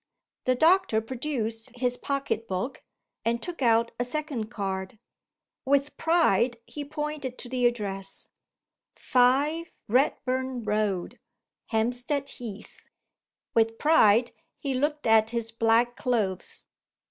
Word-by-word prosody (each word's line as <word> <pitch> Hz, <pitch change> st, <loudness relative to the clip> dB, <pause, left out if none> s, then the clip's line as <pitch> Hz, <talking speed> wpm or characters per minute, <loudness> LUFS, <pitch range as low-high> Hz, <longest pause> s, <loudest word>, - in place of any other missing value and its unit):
The 255 Hz, -, +3 dB
doctor 325 Hz, -, +4 dB
produced 235 Hz, -1 st, -3 dB
his 245 Hz, 0 st, +1 dB
pocket 275 Hz, -5 st, -2 dB
book, 190 Hz, +8 st, -3 dB, 0.4 s
and 230 Hz, +1 st, +1 dB
took 345 Hz, 0 st, -7 dB
out 230 Hz, -1 st, +3 dB
a -, -, +2 dB
second 255 Hz, -4 st, -3 dB
card. 190 Hz, -1 st, -4 dB, 0.7 s
With 280 Hz, +2 st, +1 dB
pride 255 Hz, -, +2 dB
he 295 Hz, -, -6 dB
pointed 295 Hz, -3 st, -4 dB
to -, -, -7 dB
the 250 Hz, -1 st, +3 dB
address: 195 Hz, -5 st, -4 dB, 0.7 s
"5 280 Hz, +7 st, +2 dB, 0.2 s
Redburn 255 Hz, 0 st, 0 dB
Road, 210 Hz, -4 st, -1 dB, 0.5 s
Hampstead 245 Hz, +5 st, 0 dB
Heath." 215 Hz, -4 st, -9 dB, 0.7 s
With 225 Hz, 0 st, +2 dB
pride 240 Hz, -7 st, +5 dB, 0.3 s
he 275 Hz, -3 st, -2 dB
looked 295 Hz, +3 st, -1 dB
at 220 Hz, -1 st, +5 dB
his 230 Hz, -1 st, -2 dB
black 230 Hz, +1 st, +2 dB
clothes. 215 Hz, -7 st, -2 dB
245 Hz, 110 wpm, -27 LUFS, 225-275 Hz, 0.7 s, pride